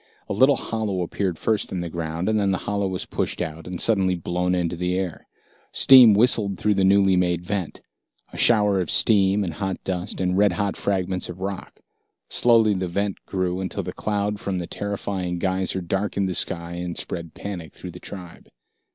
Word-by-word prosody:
A - - -3
little 130 +7 +4
hollow 105 -7 -2
appeared 90 0 -3
first 110 +2 -1
in 90 - -3
the 85 - -4
ground, 85 +1 -4
and 110 0 +2
then 100 -1 +1
the 95 - +1
hollow 100 -1 -1
was 95 -1 -4
pushed - - -3
out 80 0 -5
and 90 -1 -5
suddenly 95 -5 +2
blown 90 +1 -1
into 90 -1 -1
the 90 +1 -1
air. 95 -3 -4 0.4
Steam 125 -6 +8
whistled 105 -3 +3
through 105 +3 +1
the 95 -1 +1
newly 95 0 +4
made 90 -1 0
vent, 95 -4 -4 0.5
a - - -8
shower 105 -4 +4
of 90 - -4
steam 100 -2 +5
and 85 -4 -4
hot 95 +4 -3
dust 90 +1 -3
and 90 0 0
red 105 -3 +4
hot 100 +1 -2
fragments 95 -2 -2
of 90 +1 -8
rock. 100 0 -6 0.5
Slowly 115 -3 +4
the 95 -1 -2
vent 100 +2 -3
grew, 90 -1 -2
until 95 - -4
the - - -6
cloud 105 -1 -2
from 95 -2 -3
the 90 - -3
terrifying 95 -2 -4
geyser 95 +1 -1
darkened 95 +2 -1
the 95 - -2
sky 85 -1 -2
and 90 0 -5
spread 85 -2 -5
panic 90 -6 -7
through 90 - -9
the 90 - -11
tribe. 90 -3 -10
95 Hz, 195 wpm, -23 LUFS, 90-100 Hz, 0.5 s, Steam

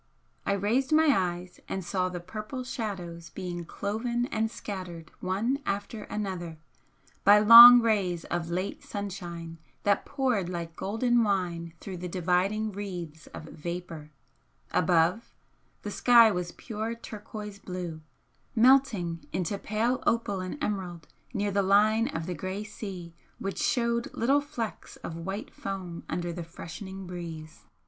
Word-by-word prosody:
I 200 - +3
raised 220 +9 +1
my 310 -2 +5
eyes 180 -1 -2
and 190 -2 -3
saw 185 +1 0
the 180 -1 -5
purple 215 +8 -6
shadows 180 -9 -5
being 175 -2 -5
cloven 235 +7 -2
and 220 0 0
scattered 180 -7 -7
one 215 +9 0
after 205 +2 -3
another, 185 -6 -4 0.7
by 205 +1 +8
long 235 +3 +11
rays 190 -7 +1
of 170 -1 -3
late 185 +3 -3
sunshine 175 -5 -6 0.2
that 200 -1 +2
poured 255 - 0
like 170 -2 -5
golden 235 +6 +1
wine 175 -5 -1
through 190 -2 -7
the 180 +1 -5
dividing 185 +5 0
wreaths 180 -6 -6
of - - -9
vapour, 165 -1 -7 0.6
above, 175 +5 +2 0.5
the 205 - -4
sky 235 0 +6
was 180 -2 -3
pure 225 0 -4
turquoise 210 -2 -8
blue, 180 -4 -6 0.5
melting 225 -9 +3
into 185 +2 -1
pale 230 +4 0
opal 215 -4 +1
and 185 +8 -5
emerald 185 - -3 0.2
near 205 -3 -1
the 200 +1 +2
line 215 +4 +4
of 160 0 -4
the 180 - -3
grey 185 +5 -4
sea 190 -5 -7 0.2
which 195 0 -4
showed 235 -1 +1
little 275 +5 +3
flecks 285 -7 -6
of 165 - -7
white 195 +6 -5
foam 185 -4 -6
under 175 +1 -2
the 175 0 -5
freshening 185 +3 -8
breeze. 165 -3 -8
195 Hz, 140 wpm, -28 LUFS, 175-220 Hz, 0.7 s, long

